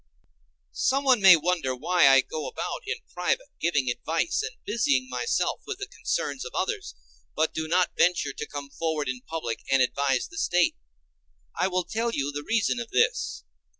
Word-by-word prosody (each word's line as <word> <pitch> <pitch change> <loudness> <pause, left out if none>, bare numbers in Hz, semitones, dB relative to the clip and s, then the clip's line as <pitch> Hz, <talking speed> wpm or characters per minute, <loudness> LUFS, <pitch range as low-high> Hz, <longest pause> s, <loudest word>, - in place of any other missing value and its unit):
Someone 265 -3 +2
may 190 -2 +10
wonder 165 -5 0
why 170 +5 +3
I 135 0 +7
go 155 +1 -5
about - - -4
in 455 +3 -2 0.2
private, - - -1
giving 150 -6 +1
advice 165 +7 -1
and - - -5
busying 140 - +1
myself 125 -1 -1
with - - -4
the - - -5
concerns - - -3
of - - -8
others, 65 - -2 0.4
but 160 - +1
do 160 0 -3
not 180 +2 +2
venture 170 -5 +2
to 150 - -6
come 145 -1 -7
forward 160 -2 -2
in 125 0 -3
public 135 -6 -4
and 135 - +5
advise 135 +1 +1
the 330 - -8
State. 175 - +2 0.8
I 185 - +1
will 185 -1 0
tell 225 +6 -2
you 140 -9 -2
the 145 0 -4
reason 225 +7 0
of 235 -1 -5
this. - - +1
160 Hz, 175 wpm, -26 LUFS, 135-195 Hz, 0.8 s, may